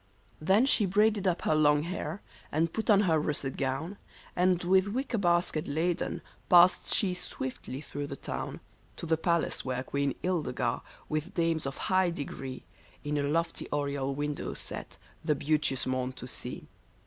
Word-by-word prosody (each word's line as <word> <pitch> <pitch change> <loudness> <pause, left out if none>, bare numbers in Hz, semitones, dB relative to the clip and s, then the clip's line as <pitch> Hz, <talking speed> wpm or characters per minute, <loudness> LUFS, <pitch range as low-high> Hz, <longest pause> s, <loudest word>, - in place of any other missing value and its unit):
Then 190 +10 +4
she 220 -7 +4
braided 205 +1 +3
up 180 -1 0
her - - +2
long 150 -1 +4
hair, 170 0 -4 0.3
and 160 +2 +1
put 220 - -3
on 205 -2 +7
her 165 -6 +3
russet 145 -3 -2
gown, 140 +8 -2 0.4
And 180 0 +3
with 190 +2 +4
wicker 240 +2 -1
basket 175 -4 +1
laden 165 +4 -1 0.3
passed 180 +1 +6
she 190 -4 +3
swiftly 130 -5 -5
through 145 -1 -5
the 140 - -5
town, - - -5 0.4
To - - -5
the 160 0 +3
palace 170 +1 0
where 130 0 -2
Queen 140 0 -1
Ildegar^ 180 -4 0 0.3
with 155 0 -3
dames 165 -3 +1
of 135 - -5
high 185 -1 +2
de 170 -4 -3
gree, 135 -2 -7 0.4
In 150 0 -2
a 140 0 0
lofty 165 +2 -1
oriel 140 -2 -1
window 145 0 -3
sat, - - -5 0.3
the 155 -2 +2
beauteous 145 -2 0
morn 130 0 -1
to - - -9
see. - - -4
160 Hz, 165 wpm, -30 LUFS, 140-180 Hz, 0.4 s, on